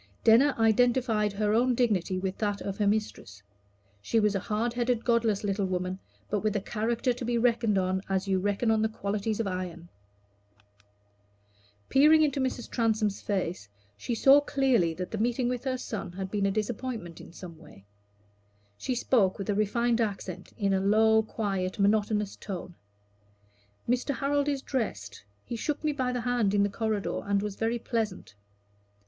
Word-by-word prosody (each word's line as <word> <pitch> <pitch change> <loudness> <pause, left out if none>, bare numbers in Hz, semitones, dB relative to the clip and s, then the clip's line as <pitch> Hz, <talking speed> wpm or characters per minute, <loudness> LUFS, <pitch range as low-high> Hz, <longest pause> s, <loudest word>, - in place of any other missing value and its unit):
Denner 250 +6 +5
identified 225 -1 +2
her 210 +1 0
own 245 +2 +3
dignity 205 -6 +1
with 190 0 -2
that 205 -2 -1
of 195 +1 -5
her 205 - +2
mistress. 200 - -2 0.6
She 225 - +1
was 210 -1 +2
a 195 - 0
hard 220 +5 -2
headed 240 -1 0
godless 230 -4 +2
little 200 -1 0
woman, 185 0 -2 0.3
but 210 - -1
with 215 +1 -1
a - - +2
character 230 +5 -1
to 245 - -7
be 240 0 0
reckoned 230 -3 +2
on 190 0 0
as 190 0 -1
you 190 -1 +2
reckon 205 +4 0
on 220 -1 +2
the 220 - +1
qualities 210 0 -3
of 225 - 0
iron. 180 -2 -5 2.0
Peering 310 +3 +6
into 280 -2 0
Mrs. 260 -2 -2
Transome's 220 -4 0
face 180 - -3 0.3
she 230 - -3
saw 275 +5 +6
clearly 255 - +1
that 180 +1 -5
the 220 - -3
meeting 240 +2 0
with 245 -1 -2
the 260 -1 -2
son 215 -7 -5
had 190 0 -5
been 200 -2 +1
a - - +1
disappointment 215 -4 -4
in - - -12
some 170 -2 -11
way. 100 - -16 0.9
She 255 - -2
spoke 220 -6 +2
with 195 +1 -2
a - - +1
refined 235 +3 +1
accent, 190 -4 -4
in 200 -3 +1
a 190 - +2
low 220 +2 +4
quick, 200 -3 -3
monotonous 210 0 +1
tone 185 -3 -7 1.1
"Mr. 250 +3 0
Harold 285 +1 0
is 280 -2 -2
dressed; 105 - -4 0.2
he 240 - -5
shook 295 +7 -3
me 305 - +1
by 260 -3 -1
the 250 -1 -2
hand 235 -4 +1
in 200 - +4
the 200 - +1
corridor, 215 -1 -2
and 200 0 0
was 210 -2 -4
very 225 +3 -1
pleasant." 220 - -3
215 Hz, 175 wpm, -28 LUFS, 195-240 Hz, 2.0 s, Peering